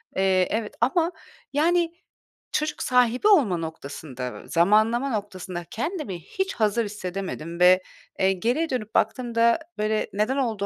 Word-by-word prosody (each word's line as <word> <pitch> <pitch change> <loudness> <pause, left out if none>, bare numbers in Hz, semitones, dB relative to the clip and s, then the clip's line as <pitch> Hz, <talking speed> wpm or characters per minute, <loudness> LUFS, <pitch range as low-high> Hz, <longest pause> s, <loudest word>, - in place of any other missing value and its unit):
Eee, 190 -1 +3
evet 220 -1 -2
ama, 325 +8 +2 0.4
yani, 335 +3 +2 0.6
çocuk 305 0 -1
sahibi 250 - +3
olma 280 - +5
noktasında, 140 -5 -6
zamanlama 215 +9 +3
noktasında 190 -5 -4
kendimi 265 - -3
hiç 385 - -3
hazır 220 +1 +1
hissedemedim 185 -4 -5
ve, 180 +1 +6 0.4
eee, 190 0 +3
geriye 245 - 0
dönüp 220 -4 -4
baktığımda, 235 +2 +2 0.2
böyle, 215 0 0
neden 215 +7 0
olduğu 225 -7 -1
215 Hz, 125 wpm, -25 LUFS, 185-255 Hz, 0.6 s, ve